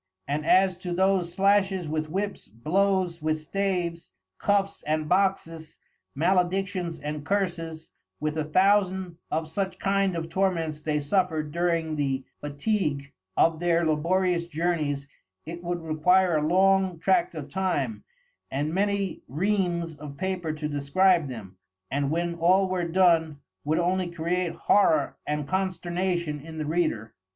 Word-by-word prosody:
And 150 +2 -2
as 185 -1 +4
to 180 -1 -4
those 190 -1 +2
slashes 195 -3 +2
with 155 0 -2
whips, 200 +4 -3
blows 180 - 0
with 155 0 0
staves, 175 0 -2 0.3
cuffs 200 -1 +1
and 155 0 0
boxes, 175 -4 0 0.4
maledictions 180 +1 0
and 150 0 -5
curses, 165 -3 -2 0.3
with 155 0 -2
a 155 - 0
Thousand 185 +1 +2
of 160 0 -1
such 190 +4 -3
kind 195 -2 +1
of 165 -1 -3
Torments 165 -4 -1
they 150 -1 0
suffered 155 -1 0
during 165 -2 0
the 135 -2 -1 0.2
fatigue 145 -2 -2 0.3
of 165 -1 +3
their 170 -1 +2
laborious 170 +3 +1
journeys 155 -4 -1 0.4
it 170 +2 -7
would 175 -1 -3
require 175 +3 +3
a 150 0 0
long 190 0 +3
tract 175 0 +1
of 150 -3 -6
time, 190 +6 -2 0.5
and 145 +4 -2
many 200 0 0
Reams 175 +1 0
of 145 -1 -9
Paper 185 -3 -2
to 155 0 -4
describe 150 +4 +2
them, 105 -7 -9 0.3
and 140 0 0
when 170 +2 -1
all 180 +3 +3
were 180 -2 -1
done 165 -4 +3 0.2
would 155 +2 0
only 180 +1 +1
create 170 +1 -1
Horror 160 -8 +3
and 150 -1 -2
Consternation 175 -3 -1
in 160 +2 -9
the 155 - -2
Reader. 150 -9 -1
170 Hz, 140 wpm, -26 LUFS, 155-190 Hz, 0.5 s, as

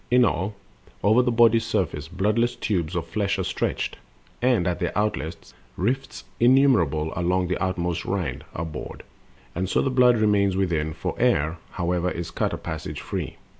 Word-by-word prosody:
In 125 0 +5
all, 95 +1 -1 0.5
Over 110 +5 +5
the 125 - +1
body's 115 -1 +5
surface, 75 +1 -1
bloodless 105 +7 +1
tubes 90 -4 -1
Of 85 -2 -1
flesh 100 +3 -1
are 95 - -1
stretched, - - -2 0.4
and, 120 -7 +3
at 90 -1 -1
their 90 +2 -2
outlets, 90 -6 -2 0.2
rifts 100 - -2 0.2
Innumerable 115 - +4
along 90 0 0
the 90 - -1
outmost 90 -2 -1
rind 95 -5 -2
Are 85 - -2
bored; 75 -2 -7 0.5
and 90 +2 -2
so - - +2
the 135 - +1
blood 125 -2 +5
remains 100 -3 +2
within; 80 -5 0
For - - -3
air, 80 +4 +2
however, 90 0 0
is 85 -1 -5
cut - - -1
a - - -3
passage 80 -2 -5
free. - - -4
95 Hz, 170 wpm, -24 LUFS, 85-110 Hz, 0.5 s, In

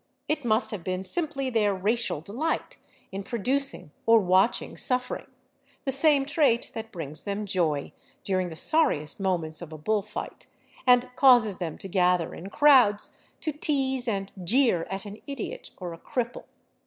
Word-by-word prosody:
It 305 -2 -1
must 225 0 +2
have 205 -6 -5
been 185 +1 -3
simply 275 - -1
their 210 -4 +2
racial 210 -3 0
delight 245 - -3 0.3
in 195 +1 -4
producing 255 - -2 0.2
or 230 0 +7
watching 190 +3 +2
suffering, 250 0 -1 0.6
the 270 - +1
same 275 0 +4
trait 285 -5 +2
that 225 0 -6
brings 155 -4 -6
them 205 +1 -3
joy 165 -7 0 0.3
during 185 -2 0
the 160 - -8
sorriest 160 - +1
moments 175 -5 -1
of 170 -2 -8
a 155 - -7
bull 210 +7 0
fight, 210 +1 -8 0.4
and 250 0 +4
causes 245 -7 +5
them 165 -4 -4
to - - -5
gather 180 -2 +2
in 185 +4 -8
crowds 255 -7 +4 0.3
to 310 - -1
tease 270 -4 0
and 195 -3 -2
jeer 225 -4 +2
at 195 +2 -4
an 205 +1 -9
idiot 275 -5 -5
or 180 -3 -6
a 165 - -11
cripple. 245 +4 -4
215 Hz, 160 wpm, -27 LUFS, 185-260 Hz, 0.6 s, or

